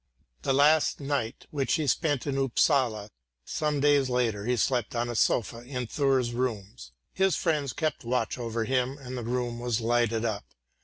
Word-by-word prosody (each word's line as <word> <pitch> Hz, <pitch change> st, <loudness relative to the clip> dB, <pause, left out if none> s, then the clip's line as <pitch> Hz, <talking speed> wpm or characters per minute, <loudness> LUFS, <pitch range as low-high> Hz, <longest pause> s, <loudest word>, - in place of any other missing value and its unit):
The -, -, 0 dB
last 145 Hz, +3 st, +4 dB
night 140 Hz, -5 st, -3 dB
which 140 Hz, -4 st, 0 dB
he 155 Hz, -2 st, -1 dB
spent 145 Hz, 0 st, 0 dB
in 140 Hz, -2 st, -1 dB
Upsala 130 Hz, -5 st, +1 dB, 0.3 s
some 150 Hz, -2 st, -1 dB
days 145 Hz, -2 st, +3 dB
later 115 Hz, -5 st, 0 dB
he 125 Hz, 0 st, +1 dB
slept 120 Hz, +2 st, 0 dB
on 120 Hz, 0 st, -1 dB
a 120 Hz, -, -4 dB
sofa 115 Hz, +1 st, +1 dB
in 125 Hz, 0 st, -4 dB
Thurs' 130 Hz, -2 st, +1 dB
rooms; 105 Hz, -, -4 dB, 0.2 s
his 190 Hz, -1 st, +2 dB
friends 150 Hz, -5 st, 0 dB
kept 155 Hz, -4 st, -2 dB
watch 120 Hz, 0 st, -1 dB
over 115 Hz, -1 st, -2 dB
him, 130 Hz, +2 st, 0 dB
and 130 Hz, -2 st, -8 dB
the 125 Hz, -, -4 dB
room 120 Hz, 0 st, -2 dB
was 120 Hz, -2 st, -1 dB
lighted 115 Hz, -1 st, +1 dB
up. 105 Hz, -3 st, -2 dB
125 Hz, 170 wpm, -28 LUFS, 115-140 Hz, 0.3 s, last